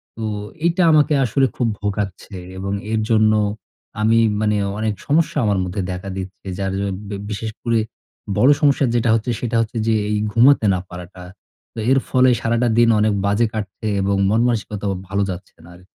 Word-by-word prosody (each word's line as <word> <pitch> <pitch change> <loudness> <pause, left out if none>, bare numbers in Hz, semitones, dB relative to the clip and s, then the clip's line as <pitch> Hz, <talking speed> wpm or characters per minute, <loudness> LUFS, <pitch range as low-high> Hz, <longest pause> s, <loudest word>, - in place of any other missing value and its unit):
তো 110 - -6 0.4
এইটা 170 +2 +2
আমাকে 150 -1 +4
আসলে 135 +4 +2
খুব 120 - 0
ভোগাচ্ছে 100 -1 -4 0.2
এবং 100 +1 -4 0.2
এর 110 - +1
জন্য 110 -1 +4 0.7
আমি 115 +1 +4 0.2
মানে 105 -1 +1 0.2
অনেক 110 -1 0
সমস্যা 155 +1 +1
আমার 100 -2 +1
মধ্যে 90 +2 -3
দেখা 90 +2 -6
দিচ্ছে। 95 +1 -8
যার 95 -1 -2
জ - - -2 0.3
ব্যা 100 - -4
বিশেষ 110 +2 -4
করে 115 -2 +2 0.6
বড় 130 - +5
সমস্যা 140 -1 +3
যেটা 115 -1 +1
হচ্ছে 115 +2 -1
সেটা 120 -1 -2
হচ্ছে 115 +1 -4
যে 115 - +3 0.2
এই 105 - +1
ঘুমাতে 120 +1 +5
না 90 - 0
পারাটা। 90 +1 -10 0.5
তো - - -7
এর 135 - +5
ফলে 130 0 +4
সারাটা 115 +1 +1
দিন 120 0 +5
অনেক 105 -1 +2
বাজে 100 +3 +2
কাটছে 110 0 -5
এবং 100 +1 +1
মনমানসিকতাও 105 -3 0
ভাল 100 +1 -2
যাচ্ছে 90 - -10
না - - -14
আরকি। 90 +1 -18
110 Hz, 175 wpm, -20 LUFS, 100-120 Hz, 0.7 s, বড়